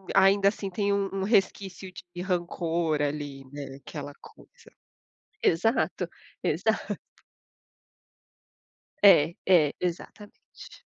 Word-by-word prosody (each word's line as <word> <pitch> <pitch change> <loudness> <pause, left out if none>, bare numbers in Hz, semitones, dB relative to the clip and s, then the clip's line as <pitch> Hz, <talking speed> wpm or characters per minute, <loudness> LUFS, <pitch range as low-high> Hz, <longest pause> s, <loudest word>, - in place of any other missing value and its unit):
ainda 195 +1 +5
assim 200 -1 -1
tem 200 +2 -1
um 200 -1 0
um 195 -1 -2
resquício 195 -2 0 0.2
de 175 - -4
rancor 170 -3 -1
ali, 145 -2 -3
né. 140 -2 -7
Aquela 145 - -7
coisa. - - -18 0.7
Exato. 225 +9 +1 0.3
Exato. - - 0 2.1
É, 170 -5 +6
é. 160 -6 +5
Exatamente. 180 +4 -7
180 Hz, 95 wpm, -27 LUFS, 155-195 Hz, 2.1 s, É